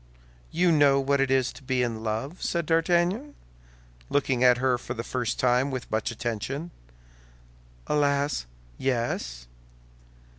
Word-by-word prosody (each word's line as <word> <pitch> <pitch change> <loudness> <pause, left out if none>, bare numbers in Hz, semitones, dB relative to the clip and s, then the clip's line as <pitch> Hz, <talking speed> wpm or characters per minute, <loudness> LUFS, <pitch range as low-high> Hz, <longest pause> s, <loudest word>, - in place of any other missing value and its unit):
"You 175 +2 +2
know 145 -3 +5
what 140 0 +1
it 135 - +1
is 130 -1 +2
to - - -13
be 130 -1 0
in 115 -2 -2
love?" 115 +10 -3
said 170 -2 -1
D'Artagnan, 175 - +1 0.7
looking 135 -3 +1
at 125 -1 +6
her 125 -1 +1
for - - -6
the 115 - -4
first 125 -2 -2
time 125 +2 +3
with 130 -2 -5
much 110 0 0
attention. 120 - -4 1.1
"Alas, 140 - +1 0.3
yes." 115 - -2
130 Hz, 135 wpm, -26 LUFS, 120-145 Hz, 1.1 s, at